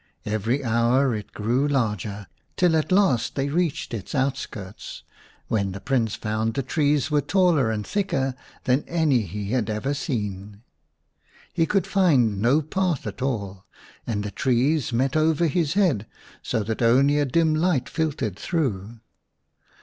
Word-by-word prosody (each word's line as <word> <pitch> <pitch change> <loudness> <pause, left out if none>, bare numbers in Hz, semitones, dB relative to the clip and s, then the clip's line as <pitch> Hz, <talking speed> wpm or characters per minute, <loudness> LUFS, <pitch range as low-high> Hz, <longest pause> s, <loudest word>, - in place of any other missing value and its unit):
Every 110 +6 -1
hour 120 +3 +2
it 105 -1 -6
grew 120 +7 0
larger, 105 -7 -1 0.3
till 175 -3 +3
at 155 +3 0
last 185 - +2
they 140 0 -1
reached 165 -4 -1
its 110 +5 -5
out 135 0 +1
skirts, 100 -8 -8 0.4
when 100 -4 -1
the 100 - -6
Prince 120 -3 0
found 110 +1 -2
the 135 - -1
trees 145 +1 +1
were 150 -1 +3
taller 165 - +2
and 105 -2 -2
thicker 135 -10 -1 0.3
than 130 +3 +2
any 160 -7 +2
he 100 +1 -5
had 120 -4 0
ever 110 +7 -1
seen. 105 - -4 0.9
He 165 -2 +1
could 195 -2 +1
find 130 - +2
no 135 +7 +3
path 175 -1 -1
at 100 0 -6
all, 100 -8 -3 0.4
and 105 -3 -1
the 105 - -4
trees 130 +5 +1
met 130 +4 0
over 160 +1 +2
his 160 0 0
head 160 - +2 0.3
so 110 - -1
that 110 +3 -3
only 135 +5 +4
a - - +3
7 140 -3 -1
dim 160 +1 +3
light 155 -5 +1
filtered 140 - -2
through. 115 - -2
130 Hz, 155 wpm, -24 LUFS, 110-155 Hz, 0.9 s, only